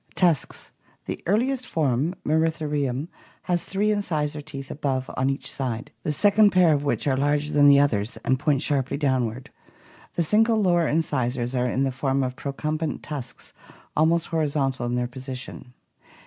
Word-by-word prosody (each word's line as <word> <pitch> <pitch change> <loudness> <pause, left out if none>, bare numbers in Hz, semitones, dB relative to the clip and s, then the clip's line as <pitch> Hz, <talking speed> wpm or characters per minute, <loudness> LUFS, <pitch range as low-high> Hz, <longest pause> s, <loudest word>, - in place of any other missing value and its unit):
Tusks. 170 -6 0 0.2
— - - -35
The - - -5
earliest 250 +6 +1
form, 150 +2 0
Mosritheriumy 150 -3 0 0.4
has 175 -2 0
three 205 +2 0
incisor 155 -7 -1
teeth 140 -2 -8
above 135 -3 -2
on 130 +1 +1
each 135 - -3
side, 125 -4 -4
the 155 - -1
second 205 +6 +5
pair 180 -4 +4
of 145 -1 0
which 145 - -1
are 135 -2 +2
larger 145 +2 0
than 145 -1 +6
the 140 0 +7
others 115 -6 +1
and 130 0 +2
point 145 -2 +1
sharply 140 -3 0
downward; 130 -4 -1 0.6
the 170 - +2
single 220 +6 +3
lower 175 -5 +3
incisors 130 -6 -1
are 125 -1 +1
in 130 +3 0
the 135 - 0
form 135 +1 0
of 125 0 -3
procumbent 150 +3 -3
tusks 135 -5 -7 0.4
almost 165 +2 +2
horizontal 140 -6 0
in 120 - -1
their 125 0 0
position. 130 0 -8
145 Hz, 160 wpm, -24 LUFS, 130-160 Hz, 0.6 s, the